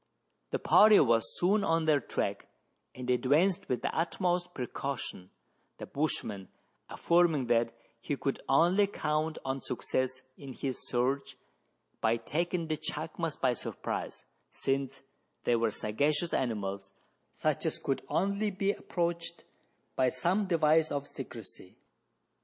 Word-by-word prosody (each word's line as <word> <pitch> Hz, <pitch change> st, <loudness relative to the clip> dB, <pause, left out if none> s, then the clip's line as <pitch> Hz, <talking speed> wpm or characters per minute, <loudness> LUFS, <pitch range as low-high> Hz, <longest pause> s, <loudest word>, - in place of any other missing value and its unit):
The -, -, 0 dB
party 215 Hz, 0 st, +7 dB
was 115 Hz, -5 st, +2 dB
soon 200 Hz, +4 st, +3 dB
on 165 Hz, 0 st, +2 dB
their 150 Hz, -2 st, +4 dB
track, -, -, -3 dB, 0.5 s
and 125 Hz, -1 st, -6 dB
advanced 145 Hz, +9 st, +2 dB
with 125 Hz, -, -1 dB
the -, -, -1 dB
utmost 175 Hz, +1 st, 0 dB
precaution, 125 Hz, -7 st, -4 dB, 0.5 s
the -, -, -6 dB
bushman 110 Hz, -9 st, -2 dB, 0.4 s
affirming 170 Hz, -6 st, +3 dB
that 115 Hz, 0 st, +2 dB, 0.3 s
he 145 Hz, +5 st, -2 dB
could 135 Hz, -, -2 dB
only 175 Hz, +8 st, +5 dB
count 155 Hz, -4 st, -1 dB
on 135 Hz, 0 st, -2 dB
success 130 Hz, 0 st, -2 dB, 0.2 s
in 135 Hz, -2 st, -8 dB
his 130 Hz, 0 st, -4 dB
search 130 Hz, +3 st, -1 dB, 0.6 s
by 115 Hz, +1 st, +3 dB
taking 170 Hz, +8 st, -2 dB
the 155 Hz, -1 st, -1 dB
chacmas 155 Hz, +1 st, -3 dB
by 130 Hz, -2 st, +3 dB
surprise, -, -, -5 dB, 0.2 s
since 135 Hz, 0 st, -2 dB, 0.4 s
they 120 Hz, -, +3 dB
were 115 Hz, -1 st, +2 dB
sagacious 145 Hz, +11 st, 0 dB
animals, 100 Hz, -5 st, -2 dB, 0.4 s
such -, -, 0 dB
as -, -, 0 dB
could -, -, -2 dB
only 200 Hz, +4 st, +1 dB
be 195 Hz, 0 st, 0 dB
approached 170 Hz, -3 st, -3 dB, 0.5 s
by 130 Hz, -1 st, +3 dB
some 175 Hz, +11 st, 0 dB
device 160 Hz, -2 st, +3 dB
of 140 Hz, -1 st, -2 dB
secrecy. 115 Hz, -8 st, -9 dB
145 Hz, 130 wpm, -31 LUFS, 125-170 Hz, 0.6 s, party